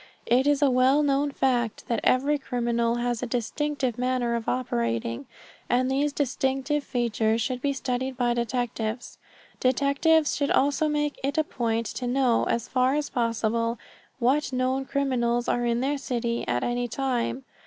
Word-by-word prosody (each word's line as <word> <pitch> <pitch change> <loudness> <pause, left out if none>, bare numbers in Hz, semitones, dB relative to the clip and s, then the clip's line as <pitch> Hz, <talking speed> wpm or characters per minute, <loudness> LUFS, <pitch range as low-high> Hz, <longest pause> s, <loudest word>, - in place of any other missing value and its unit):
It 255 +3 +3
is 290 0 +3
a 280 - +5
well 260 +4 +4
known 285 0 +2
fact 245 -5 0
that 235 - 0
every 285 +3 +2
criminal 235 -2 0
has 240 -1 -1
a 250 - -2
distinctive 255 +1 -2
manner 250 -1 0
of 230 -1 -2
operating, 115 - -2 0.4
and 255 +1 +2
these 285 +2 +1
distinctive 270 +1 -1
features 230 -3 0
should 250 +1 -2
be 285 - +1
studied 260 -1 -3
by 240 -2 +2
detectives. 235 -1 -3 0.4
Detectives 280 +4 +2
should 285 -1 0
also 285 +3 +2
make 295 -1 -1
it 280 +3 -1
a 315 - +4
point 230 -5 -2
to 250 - -4
know, 250 -2 +2
as 235 - -1
far 255 +1 +2
as 300 -1 -2
possible, 230 0 0 0.4
what 270 +4 +1
known 260 +1 0
criminals 245 -4 0
are 240 0 +1
in 235 0 +1
their 280 +2 0
city 235 -3 -2
at 120 0 0
any 245 0 -1
time. 260 0 -2
255 Hz, 160 wpm, -26 LUFS, 235-275 Hz, 0.4 s, a